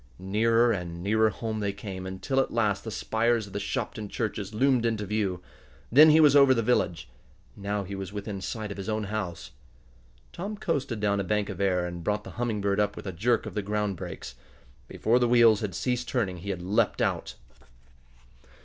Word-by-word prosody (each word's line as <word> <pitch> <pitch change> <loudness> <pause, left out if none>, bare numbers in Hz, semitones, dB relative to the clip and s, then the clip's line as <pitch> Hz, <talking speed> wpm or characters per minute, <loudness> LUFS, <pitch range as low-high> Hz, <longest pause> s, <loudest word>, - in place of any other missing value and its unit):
Nearer 115 +5 +2
and 85 -4 -4
nearer 110 +2 +3
home 110 +1 -4
they 100 -1 -1
came, 95 -2 -7
until 95 +9 -2
at 135 - +1
last 105 -4 0
the 115 - -5
spires 115 +1 0
of 100 - -13
the 100 - -2
Shopton 105 -1 -4
churches 105 -3 -3
loomed 125 +2 +2
into 110 -3 -1
view. 100 -3 -2 0.5
Then 150 +6 +8
he 155 +1 +6
was 150 -2 +6
over 140 -2 +7
the 115 - 0
village. 95 - 0 0.5
Now 100 0 -3
he 100 +1 -7
was 95 -1 -5
within 100 -1 -5
sight 105 +2 -4
of 100 - -6
his 100 +2 -5
own 110 0 -1
house. 100 -7 -4 0.8
Tom 200 +4 -5
coasted 140 - -2
down 100 -1 +1
a - - 0
bank 105 +2 -1
of 100 -1 -5
air, 90 -2 +1
and 85 -1 -6
brought 105 +2 -1
the - - -9
Humming 110 -4 -1
Bird 100 0 0
up 105 - +1
with - - -9
a 95 - -3
jerk 115 +6 +1
of - - -6
the 105 - -1
ground 105 0 -1
brakes. - - -7 0.5
Before 120 +3 +1
the 120 - +2
wheels 115 -3 +5
had 100 -5 -3
ceased 125 -1 -1
turning 100 -8 -1
he 95 +4 -7
had 90 -3 -3
leaped 95 +4 +1
out. - - -2
105 Hz, 205 wpm, -27 LUFS, 100-115 Hz, 0.8 s, Then